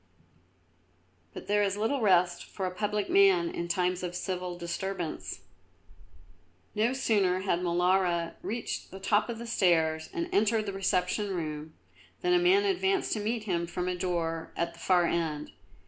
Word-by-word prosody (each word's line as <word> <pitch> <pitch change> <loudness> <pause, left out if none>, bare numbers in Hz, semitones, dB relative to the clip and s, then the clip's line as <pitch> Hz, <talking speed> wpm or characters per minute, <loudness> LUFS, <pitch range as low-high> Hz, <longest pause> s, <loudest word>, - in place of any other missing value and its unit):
But - - -9
there 205 0 +3
is 200 -1 0
little 225 +6 0
rest 180 -4 +3
for 190 - -5
a 185 - -2
public 210 +2 -1
man 375 -2 +4
in 170 - -4
times 180 +1 0
of 180 -1 -4
civil 180 -1 -3
disturbance. 175 0 -4 1.3
No 220 +3 +2
sooner 205 -8 +1
had 190 -3 0
Molara 175 -1 +1
reached 230 +2 -4
the 190 - -9
top 205 +4 +1
of 235 - -3
the 235 - -7
stairs 160 -7 +2
and 335 -1 -2
entered 215 +1 +2
the 200 - -4
reception 195 +1 0
room, 155 -2 -5 0.5
than 360 0 +2
a 355 - +5
man 375 +3 +4
advanced 385 0 +1
to 215 - -1
meet 220 +2 -2
him 170 -5 -1
from 180 +1 -3
a 180 - 0
door 170 -3 -2
at 170 0 -1
the 170 - -16
far 180 -2 +3
end. 160 -3 -2
185 Hz, 165 wpm, -29 LUFS, 175-220 Hz, 1.3 s, a